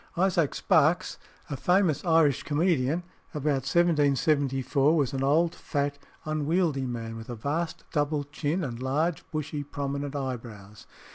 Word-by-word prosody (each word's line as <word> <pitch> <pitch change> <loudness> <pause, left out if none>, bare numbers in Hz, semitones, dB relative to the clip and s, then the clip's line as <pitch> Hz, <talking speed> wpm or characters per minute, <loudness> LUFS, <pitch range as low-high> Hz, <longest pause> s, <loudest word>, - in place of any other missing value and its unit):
Isaac 175 -5 +2
Sparkes, 160 +3 +2 0.3
a 145 - -4
famous 180 +1 +2
Irish 160 -5 +3
comedian 155 0 +1 0.3
about 145 -3 0
1774, 145 -3 +2
was 140 -5 +1
an 135 - -2
old, 160 +5 +3
fat, 140 -1 -2 0.3
unwieldy 155 -2 0
man, 115 -2 -5
with 115 +1 -9
a 120 - -4
vast 155 +8 -3
double 145 0 0
chin, 150 +4 -2
and 120 -4 -5
large, 155 +6 0
bushy, 155 -1 -3
prominent 140 0 -4
eyebrows. 115 -7 -6
145 Hz, 130 wpm, -27 LUFS, 135-160 Hz, 0.3 s, Irish